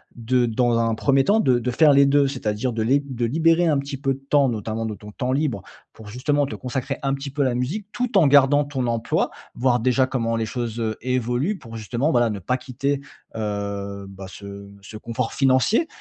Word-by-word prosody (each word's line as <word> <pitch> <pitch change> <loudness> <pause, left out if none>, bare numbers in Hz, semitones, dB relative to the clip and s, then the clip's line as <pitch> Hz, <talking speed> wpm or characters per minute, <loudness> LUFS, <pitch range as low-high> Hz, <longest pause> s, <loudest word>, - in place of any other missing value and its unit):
de 120 +1 +1
dans 120 +1 +1
un 115 -1 +1
1er 135 +3 +2
temps 205 +10 +3
de 130 - +3
de 125 +1 -2
faire 150 +3 +5
les 140 0 +6
2? 140 0 +4
C'est-à-dire 120 -2 -2
de 110 - -2
léb 135 +3 0
de 120 0 0
libérer 165 +6 +3
un 155 -3 +3
petit 140 +1 -4
peu 135 0 -1
de - - -14
temps 140 0 +2
notamment 110 0 -3
de 110 -1 -4
ton 105 +1 -12
temps 130 -1 -2
libre 130 -7 0 0.3
pour 110 -2 -12
justement 145 +5 0
te 140 - -6
consacrer 130 +2 -4
un 135 0 +1
petit 140 +1 -4
peu 140 +1 -1
à - - +1
la 125 -2 0
musique 160 - -3
tout 245 -3 0
en 165 -6 +6
gardant 140 +1 +5
ton 135 -3 -3
emploi, 115 -1 0 0.2
voir 125 0 +1
déjà 130 +2 +2
comment 115 -4 -1
les 115 -1 -1
choses, 120 0 -4
heu, 110 -1 -2
évoluent 125 - -1
pour 115 -7 -10
justement 120 - -1
voilà 120 -5 +3
ne 105 -2 -4
pas 125 +8 -1
quitter, 140 +2 -2 0.4
heu, 100 -2 -4
bah 95 0 -10
ce 100 +1 -10
ce 105 +2 -10
confort 115 +2 -3
financier 135 - +3
125 Hz, 220 wpm, -23 LUFS, 115-140 Hz, 0.4 s, les